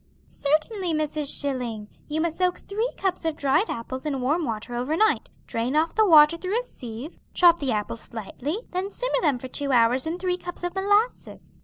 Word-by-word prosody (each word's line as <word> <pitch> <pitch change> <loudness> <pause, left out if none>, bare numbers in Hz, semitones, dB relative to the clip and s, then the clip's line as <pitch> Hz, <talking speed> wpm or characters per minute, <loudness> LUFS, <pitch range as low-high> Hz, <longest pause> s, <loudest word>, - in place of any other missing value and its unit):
"Certainly, 320 +5 0
Mrs. 305 -1 0
Schilling. 245 -7 -3 0.2
You 310 +1 -1
must 330 0 -2
soak 360 -1 +2
three 440 +5 -2
cups 375 -2 -1
of 320 -2 -1
dried 305 +8 +2
apples 260 +3 -5
in 285 -3 -2
warm 300 +6 +1
water 225 0 -4
over 255 +7 -1
night, 435 +2 +2 0.2
drain 235 +5 -2
off 320 +2 +2
the 435 -1 +4
water 310 -1 +7
through 380 +6 -1
a - - -4
sieve, 250 - -9 0.2
chop 345 -1 +6
the 275 -3 -1
apples 215 +1 -2
slightly, 255 - -5
them 370 +2 -2
simmer - - -1
them 285 - +2
for 260 - -7
two 280 +2 -3
hours 245 +3 +3
in 330 +2 -2
three 360 0 -1
cups 355 -1 -8
of 355 - -2
molasses. 410 +5 0
310 Hz, 195 wpm, -25 LUFS, 260-365 Hz, 0.2 s, water